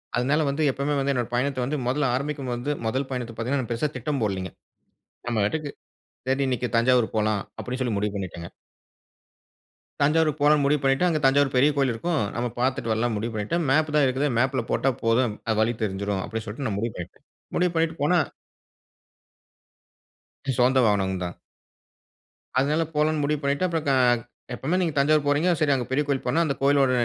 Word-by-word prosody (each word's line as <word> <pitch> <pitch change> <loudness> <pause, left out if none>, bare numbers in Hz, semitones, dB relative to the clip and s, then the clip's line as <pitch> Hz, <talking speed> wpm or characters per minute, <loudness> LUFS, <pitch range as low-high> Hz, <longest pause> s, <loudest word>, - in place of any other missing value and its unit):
அதனால 135 +6 +2
வந்து 140 +3 -1
எப்பவுமே 140 +2 -1
வந்து 135 +1 +1
என்னோட 120 -3 -1
பயணத்த 130 +1 0
வந்து 145 +4 -2
முதல்ல 135 0 +1
ஆரம்பிக்கும் 140 0 -3
போது 120 +5 -2
முதல் 130 +4 -1
பயணத்த 125 -3 -4
பாத்தீங்கன்னா, 125 +1 -2
பெருசா 120 +6 0
திட்டம் 145 -4 -2
போடலிங்க. 95 -3 -2 0.8
நம்ம 120 -2 -1
பாட்டுக்கு 150 +7 -2 0.6
சரி, 135 +1 +1
இன்னைக்கு 125 -1 -1
தஞ்சாவூர் 120 0 +3
போலா 110 0 +2 0.3
அப்பிடின்னு 125 +1 -4
சொல்லி 120 -4 -1
முடிவு 105 0 -1
பண்ணிடேங்க. 90 -3 -5 1.5
தஞ்சாவூரு 155 +2 +3
போலானு 145 0 +4
முடிவு 145 +1 +2
பண்ணிட்டு 135 +5 +2
அங்க 160 -3 +1
தஞ்சாவூர் 135 0 +3
பெரிய 130 +4 +5
கோவில் 135 -3 +2
இருக்கும். 160 +8 -1 0.2
நம்ம 120 +1 -1
பாத்துட்டு 130 -2 0
வரலானு 110 +1 0
முடிவு 115 +2 -3
பண்ணிட்டேன். 110 +12 -1
மேப் 155 +2 +2
தான் 150 -2 +5
இருக்குதே. 135 +3 0
மேப்ல 130 +1 +1
போட்டா 135 - +2
போது 115 +2 +3 0.3
அது 110 - +1
வழி 110 +2 +2
தெறிச்சுடும் 100 -1 -2
அப்பிடின்னு 115 -1 -5
சொல்லிட்டு 120 +6 -4
நான் 100 -3 -2
முடிவு 115 0 -2
பண்ணிட்டேன். 90 - -9 0.3
முடிவு 180 0 +2
பண்ணிட்டு 165 0 +1
போனா. 175 +4 +4 2.4
சொந்த 130 +2 +4
வாகனம் 95 -3 +1
தான். 90 0 -5 1.2
அதனால 150 +4 +2
போலான்னு 150 0 +1
முடிவு 150 +1 0
பண்ணிட்டு, 140 +6 +1
அப்புறம் 165 -3 -2
க - - +3 0.6
எப்பவுமே 155 +9 -1
நீங்க 165 -4 0
தஞ்சாவூர் 150 +1 +3
போறீங்க 145 +5 +2
சரி, 150 -2 +2
அங்க 125 -2 -2
பெரிய 135 +3 +1
கோயில் 140 -2 0
போனா 140 +7 +2
அந்த 145 - 0
கோயிலோட 140 -1 +4
135 Hz, 170 wpm, -25 LUFS, 115-150 Hz, 2.4 s, பெரிய